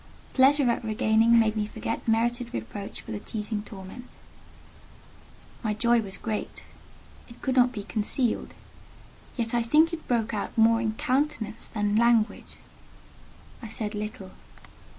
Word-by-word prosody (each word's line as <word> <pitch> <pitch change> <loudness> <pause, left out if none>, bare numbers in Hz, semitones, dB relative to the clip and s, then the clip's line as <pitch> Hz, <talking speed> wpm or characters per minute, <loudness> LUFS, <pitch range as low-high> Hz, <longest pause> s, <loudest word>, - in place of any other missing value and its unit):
Pleasure 275 +1 +5
at 235 - -2
regaining 220 +1 +3
made 220 -1 +3
me 210 -1 -1
forget 225 +2 -5
merited 235 - 0
reproach 115 - -6
for - - -10
the 210 - -3
teasing 210 0 -4
torment; 205 +4 -10 1.5
my 215 -3 -1
joy 235 +2 +3
was 195 -2 -5
great; 220 -2 -4 0.7
it 235 - -14
could 260 -2 0
not 250 -1 +5
be 210 -5 -6
concealed: 220 +4 -1 0.8
yet 230 -1 -2
I 240 - +3
think 310 +8 +4
it 320 - -6
broke 230 -2 0
out 205 +1 -4
more 225 +1 +5
in 220 -2 -1
countenance 255 -2 -1
than 210 -1 0
language. 230 -1 +2 1.1
I 230 - -7
said 215 0 -5
little. 210 -2 -6
225 Hz, 140 wpm, -27 LUFS, 210-240 Hz, 1.5 s, Pleasure